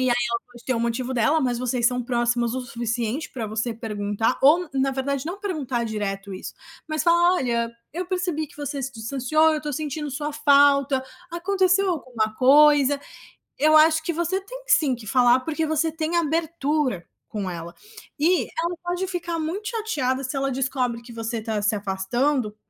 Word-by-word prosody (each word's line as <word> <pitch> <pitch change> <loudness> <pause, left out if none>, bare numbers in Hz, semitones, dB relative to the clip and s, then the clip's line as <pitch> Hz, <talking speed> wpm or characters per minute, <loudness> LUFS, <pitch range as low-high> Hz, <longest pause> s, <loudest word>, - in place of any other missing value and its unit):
e 255 - +2
aí 240 - +3
ela 235 - -1
pode 240 - -15
ter 260 - 0
o 230 - -1
motivo 240 +2 -1
dela. 295 +7 +3
Mas 245 -2 0
vocês 250 -1 -1
são 250 0 +1
próximas 240 0 0
o 260 - -3
suficiente 235 +4 -3
para 235 -5 -4
você 220 +2 -2
perguntar 210 +1 -2
ou, 325 +5 +5
na 270 0 +2
verdade, 275 +2 -2
não 365 +4 -4
perguntar 275 - -2
direto 200 -2 -4
isso, 185 - -7 0.3
mas 310 0 -1
fala: 345 +1 +4
"Olha, 235 -6 0 0.2
eu 350 +2 -4
percebi 355 -4 -1
que 295 - -19
você 285 -1 -4
se 265 +2 -4
distanciou, 270 +7 +2
eu - - 0
estou 295 -1 -5
sentindo 295 0 -4
sua 295 +2 -3
falta, 280 -2 +4 0.3
aconteceu 375 +2 +2
alguma 235 -9 -2
coisa?". 285 +1 +5 0.6
Eu 310 +1 +6
acho 315 0 +5
que 340 - -1
você 345 +4 -1
tem - - -10
sim 280 -5 +4
que 225 -3 -12
falar, 250 +1 +4
porque 320 +2 -2
você 315 +1 +1
tem 325 +2 -1
abertura 305 - 0 0.3
com 205 -4 -3
ela 170 0 -7 0.4
e 345 +4 +3
ela 340 +2 -3
pode 355 +2 -2
ficar 345 -2 -3
muito 380 +7 -3
chateada 295 - -1
se 260 +2 -4
ela 275 0 0
descobre 255 -2 -1
que 235 0 -12
você 225 +1 -3
está 215 -1 -2
se 210 +1 +1
afastando, 210 +5 -1
270 Hz, 180 wpm, -24 LUFS, 235-315 Hz, 0.6 s, Eu